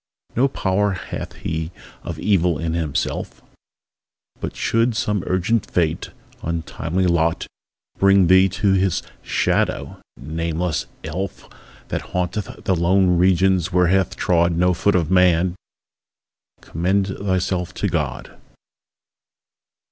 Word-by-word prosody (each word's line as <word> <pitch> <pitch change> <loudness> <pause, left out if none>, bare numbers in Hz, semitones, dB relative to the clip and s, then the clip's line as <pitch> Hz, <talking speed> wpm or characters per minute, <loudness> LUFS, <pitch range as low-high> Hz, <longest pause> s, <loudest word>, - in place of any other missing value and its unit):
No 130 +4 +4
power 105 -5 0
hath 95 - -6
he 80 0 -4 0.3
of - - -6
evil 90 -5 +2
in 80 +1 -2
himself; 75 -6 -2 1.0
But - - -5
should 115 +1 +1
some 105 -4 0
urgent 95 +4 0
fate 85 -1 0 0.3
(untimely 85 +2 -2
lot!) 85 -1 +1 0.5
Bring 100 -1 +5
thee 95 +2 +5
to 95 +1 +1
meet 95 - +3
his 95 -3 0 0.2
shadow - - -1 0.2
(nameless 80 -1 -2 0.2
elf, 90 +4 -5 0.4
That - - -2
haunteth 90 +3 -4
the 95 - +1
lone 90 +1 +3
regions 90 -1 +3
where 90 -1 +3
hath 95 -1 +1
trod 85 -1 +2
No 90 +2 +2
foot 100 +3 +1
of 85 -2 +1
man,) 90 -1 +4 1.1
commend 95 +4 0
thyself 95 -2 -1
to 100 - -1
God! 75 -7 -3
90 Hz, 115 wpm, -21 LUFS, 85-95 Hz, 1.1 s, Bring